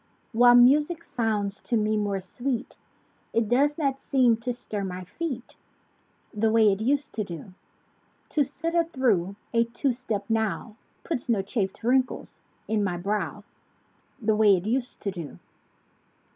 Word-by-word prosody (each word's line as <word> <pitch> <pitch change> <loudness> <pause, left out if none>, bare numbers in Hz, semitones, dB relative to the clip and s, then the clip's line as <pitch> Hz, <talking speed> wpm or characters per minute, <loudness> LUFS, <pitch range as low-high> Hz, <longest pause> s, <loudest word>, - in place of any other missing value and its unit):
While 245 +1 +6
music 295 +7 +5
sounds 210 -4 -2
to 235 - 0
me 215 0 +1
more 205 -2 0
sweet. 245 +6 -4 0.6
It 230 -1 +2
does 280 +6 +2
not 275 -4 0
seem 255 -5 +3
to 230 +2 -3
stir 215 -4 -5
my 185 -1 -5
feet 255 - -5 0.8
The 220 +1 +1
way 220 -2 +5
it 195 +2 -2
used 280 +5 0
to 215 - -1
do. 180 0 -8 0.8
To 295 - +2
sit 330 +5 -4
a 340 -1 +3
through 220 - +1 0.2
a 230 0 +4
two 240 +3 -1
step 220 -5 -3
now 220 -1 -1 0.3
Puts 260 -7 -3
no 210 -5 +2
chafed 200 0 -3
wrinkles 255 +2 0 0.3
in 215 -1 +1
my 180 -3 -1
brow 200 +4 -2 0.8
The 220 -1 +1
way 210 -3 +5
it 175 - -5
used 245 +3 -2
to 200 - -2
do. 170 -6 -7
225 Hz, 155 wpm, -26 LUFS, 205-260 Hz, 0.8 s, While